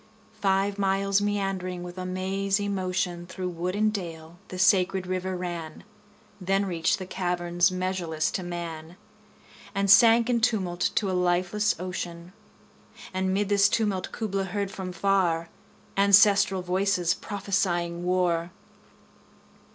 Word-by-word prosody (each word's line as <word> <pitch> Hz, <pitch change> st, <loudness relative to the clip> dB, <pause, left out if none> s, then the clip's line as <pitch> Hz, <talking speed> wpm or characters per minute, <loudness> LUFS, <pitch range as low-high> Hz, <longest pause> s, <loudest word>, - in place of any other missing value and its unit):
Five 195 Hz, +1 st, +1 dB
miles 195 Hz, 0 st, +1 dB
meandering 195 Hz, -3 st, -2 dB
with 175 Hz, 0 st, -8 dB
a 185 Hz, -, -4 dB
mazy 195 Hz, +2 st, -1 dB
motion 180 Hz, -3 st, -2 dB
25 -, -, -28 dB
Through 185 Hz, -1 st, -3 dB
wood 180 Hz, +2 st, -3 dB
and 215 Hz, +1 st, +2 dB
dale 170 Hz, -3 st, -7 dB
the 185 Hz, -, -7 dB
sacred 190 Hz, 0 st, +3 dB
river 185 Hz, 0 st, -3 dB
ran, 170 Hz, -3 st, -6 dB, 0.6 s
Then 195 Hz, +2 st, +1 dB
reach'd 170 Hz, -4 st, 0 dB
the 185 Hz, -, -6 dB
caverns 175 Hz, -1 st, 0 dB
measureless 185 Hz, -4 st, -2 dB
to -, -, -3 dB
man, 170 Hz, -1 st, -6 dB, 0.8 s
And 195 Hz, -1 st, +2 dB
sank 230 Hz, +1 st, +7 dB
in 240 Hz, -2 st, +1 dB
tumult 190 Hz, -7 st, +1 dB
to 200 Hz, -3 st, +1 dB
a -, -, -2 dB
lifeless 180 Hz, +3 st, +1 dB
ocean: 175 Hz, -1 st, -6 dB, 0.8 s
And 190 Hz, 0 st, 0 dB
'mid 200 Hz, +1 st, 0 dB
this 200 Hz, 0 st, +4 dB
tumult 205 Hz, -4 st, -1 dB
Kubla 195 Hz, -3 st, -2 dB
heard 200 Hz, +1 st, -3 dB
from 190 Hz, -2 st, -6 dB
far 175 Hz, -3 st, +1 dB, 0.5 s
Ancestral 200 Hz, -1 st, +5 dB
voices 180 Hz, -1 st, +1 dB
prophesying 180 Hz, -4 st, -2 dB
war! 175 Hz, -2 st, +1 dB
185 Hz, 130 wpm, -26 LUFS, 175-195 Hz, 0.8 s, sank